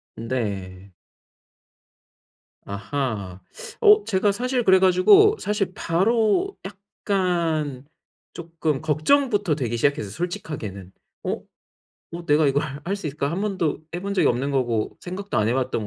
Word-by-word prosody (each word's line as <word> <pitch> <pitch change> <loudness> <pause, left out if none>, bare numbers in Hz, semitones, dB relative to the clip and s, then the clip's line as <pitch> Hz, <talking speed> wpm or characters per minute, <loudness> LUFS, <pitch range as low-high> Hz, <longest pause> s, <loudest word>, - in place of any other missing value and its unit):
네. 100 -6 -4 1.7
아하. 100 -3 -4 0.4
어 420 -1 +7
제가 200 +1 +2
사실 250 +3 -1
그래 190 -3 +5
가지고 190 - +6
사실 200 -3 -1
바로 225 - +1
약간 175 -8 -2 0.5
쪼끔 165 -4 -3
걱정부터 200 - +2
되기 120 -5 -2
시작했어요, 140 -6 0
솔직하게는. 110 - -5 0.3
'어? - - -1 0.8
어 170 0 -7
내가 150 +1 +4
이걸 140 +2 +2 0.2
할 195 +3 -1
수 185 - -6
있을까? 140 0 -2
1 180 +4 -3
번도 190 -7 -1 0.2
해 175 - -3
본 200 +1 -3
적이 - - +3
없는 130 +4 0
거고 120 -5 -1
생각도 185 - -4
안 110 0 +2
해 120 - +1
봤던 130 -5 -1
160 Hz, 245 characters per minute, -23 LUFS, 125-200 Hz, 1.7 s, 어